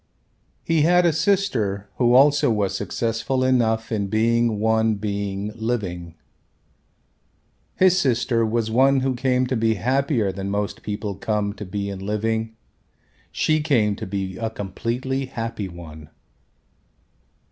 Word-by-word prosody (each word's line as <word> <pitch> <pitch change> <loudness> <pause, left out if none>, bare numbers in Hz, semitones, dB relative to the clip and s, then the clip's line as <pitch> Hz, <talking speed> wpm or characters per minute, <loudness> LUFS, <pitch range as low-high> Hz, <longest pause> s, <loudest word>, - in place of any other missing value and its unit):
He 165 -2 +2
had 175 +3 +4
a 170 - +3
sister 145 - 0
who 120 -1 +3
also 145 +1 +5
was 105 -4 0
successful 120 +3 -1
enough 115 -3 +1
in 100 -3 -1
being 115 +1 +1
one 110 0 +2
being 100 0 -3
living. 100 -8 -4 1.6
His 185 0 +4
sister 120 -4 +1
was 110 0 -1
one 135 +3 +4
who 130 0 0
came 125 0 +1
to 130 +1 -1
be 110 -1 +1
happier 125 - 0
than 95 +1 -5
most 100 0 -2
people 105 0 -4
come 100 +1 -2
to 105 - -8
be 100 +2 -4
in 100 -1 -5
living. 110 +2 -2 0.8
She 155 0 +1
came 115 -9 +2
to - - -6
be 95 -1 -4
a 115 -1 -2
completely 120 +6 -3
happy 115 -5 -4
one. 80 -4 -11
110 Hz, 135 wpm, -23 LUFS, 100-130 Hz, 1.6 s, also